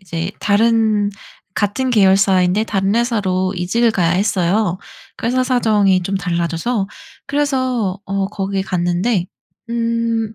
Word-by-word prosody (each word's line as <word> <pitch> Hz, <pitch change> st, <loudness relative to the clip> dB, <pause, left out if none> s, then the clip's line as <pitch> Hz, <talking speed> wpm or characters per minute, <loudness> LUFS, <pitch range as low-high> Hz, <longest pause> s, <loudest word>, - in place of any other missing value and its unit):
이제 175 Hz, 0 st, -4 dB
다른 215 Hz, -1 st, +2 dB, 0.4 s
같은 235 Hz, +6 st, -1 dB
계열사인데 195 Hz, -2 st, +3 dB
다른 195 Hz, -2 st, 0 dB
회사로 195 Hz, -6 st, 0 dB
이직을 225 Hz, +7 st, +1 dB
가야 175 Hz, -5 st, +1 dB
했어요. 185 Hz, 0 st, +1 dB, 0.4 s
그 -, -, -3 dB
회사 255 Hz, +2 st, +1 dB
사정이 210 Hz, -7 st, +2 dB
좀 195 Hz, +2 st, -1 dB
달라져서. 180 Hz, +4 st, -1 dB, 0.4 s
그래서 260 Hz, -8 st, -1 dB
어 195 Hz, 0 st, -1 dB
거기 195 Hz, -1 st, -2 dB
갔는데 180 Hz, +2 st, 0 dB, 0.4 s
음 230 Hz, -1 st, -1 dB
200 Hz, 260 characters per minute, -18 LUFS, 185-230 Hz, 0.4 s, 계열사인데